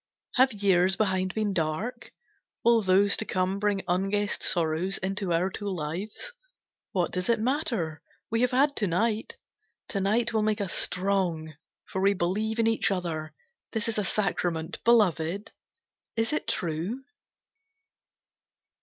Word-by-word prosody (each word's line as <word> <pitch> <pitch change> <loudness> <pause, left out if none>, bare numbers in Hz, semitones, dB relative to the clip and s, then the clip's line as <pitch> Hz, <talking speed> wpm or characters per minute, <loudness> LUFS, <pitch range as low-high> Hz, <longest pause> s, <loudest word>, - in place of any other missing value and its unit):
Have 260 +1 +5
years 190 -2 +3
behind 190 -2 0
been 215 -2 0
dark? 190 +10 -2 0.5
Will 235 -1 +5
those 200 +1 +4
to - - -1
come 185 +1 0
Bring 205 -1 0
unguessed 195 +3 0
sorrows 170 +3 +1
into 195 -1 -2
our 175 +3 +1
two 205 +1 -4
lives? 190 - -4 0.6
What 180 -3 0
does 180 +2 -2
it 230 -1 +3
matter, 225 - -1 0.3
we 230 +1 +1
have 250 - +4
had 280 +3 +3
to 205 - +1
night! 215 +5 0 0.5
To 200 - -1
night 225 +4 +1
will 220 - +2
make 215 0 +1
us 195 -4 -2
strong, 180 -4 0 0.3
for 190 - -3
we 200 +1 +4
believe 210 +6 -1
Each 225 0 +2
in 195 - +1
the - - -1
other, 155 -3 -4 0.4
this 225 +1 -1
is 225 -2 -1
a - - +1
sacrament. 180 -5 -1
Beloved, 200 -4 +2 0.6
is 225 +4 0
it 305 - -2
true? 175 +10 -2
195 Hz, 145 wpm, -28 LUFS, 180-220 Hz, 0.6 s, Have